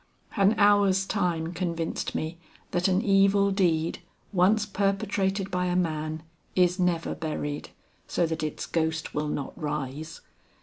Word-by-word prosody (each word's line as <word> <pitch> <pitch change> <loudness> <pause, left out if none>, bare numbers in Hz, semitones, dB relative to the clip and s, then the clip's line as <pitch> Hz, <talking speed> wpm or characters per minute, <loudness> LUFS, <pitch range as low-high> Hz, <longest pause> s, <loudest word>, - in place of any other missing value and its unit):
An 200 +1 +4
hour's 200 -2 +4
time 175 -4 -1
convinced 170 -2 -2
me 160 +2 -3 0.3
that 175 +2 +1
an 190 +3 +2
evil 200 -1 +4
deed 170 -4 +1 0.3
once 200 +4 +4
perpetrated 195 -1 0
by 180 0 0
a 180 - 0
man, 155 -2 -1 0.3
is 180 0 +3
never 175 -2 +1
buried 145 -2 -4 0.4
so 175 - +1
that 160 0 -3
its 155 -1 -3
ghost 160 -1 -1
will 150 +1 -1
not 145 -2 -3
rise. 150 0 -4
180 Hz, 135 wpm, -27 LUFS, 160-195 Hz, 0.4 s, An